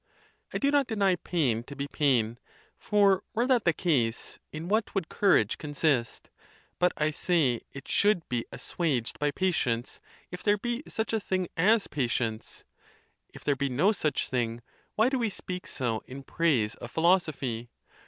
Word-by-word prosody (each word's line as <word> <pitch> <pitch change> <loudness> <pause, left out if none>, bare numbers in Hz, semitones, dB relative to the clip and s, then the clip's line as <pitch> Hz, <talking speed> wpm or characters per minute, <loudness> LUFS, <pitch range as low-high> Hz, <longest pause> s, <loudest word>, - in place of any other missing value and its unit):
I - - -2
do 280 0 +2
not 285 -3 +3
deny 200 -5 +2
pain 145 -11 0
to 140 - -9
be 140 +1 -3
pain—for 145 - +1
were 235 +2 +2
that 250 -4 +2
the 170 - +5
case, 130 -10 0
in 155 +2 -6
what 215 +3 0
would 190 -5 -1
courage 150 - +3
consist 145 -5 -1 0.5
?—but 180 0 +4
I 155 0 +1
say 150 -7 +1
it 140 0 -10
should 200 -5 +2
be 120 -2 -1
as - - -9
suaged 140 -9 -1
by 150 - +2
patience, 140 -9 -1 0.3
if 180 - -7
there 205 0 +3
be 240 +4 -2
such 220 0 -3
a 220 - +2
thing 185 -3 -2
as 210 +5 +4
patience: 120 -5 -2 0.7
if - - -13
there 145 - +2
be 140 +1 -1
no 150 +11 +3
such 155 -9 -1
thing, 120 -2 -2 0.3
why 220 +2 +4
do 265 0 0
we 230 -2 +1
speak 180 -2 -6
so 120 -5 -2
in 135 +2 -8
praise 135 -10 +1
of 120 - -9
philosophy 155 -8 +1
155 Hz, 165 wpm, -28 LUFS, 125-195 Hz, 0.7 s, the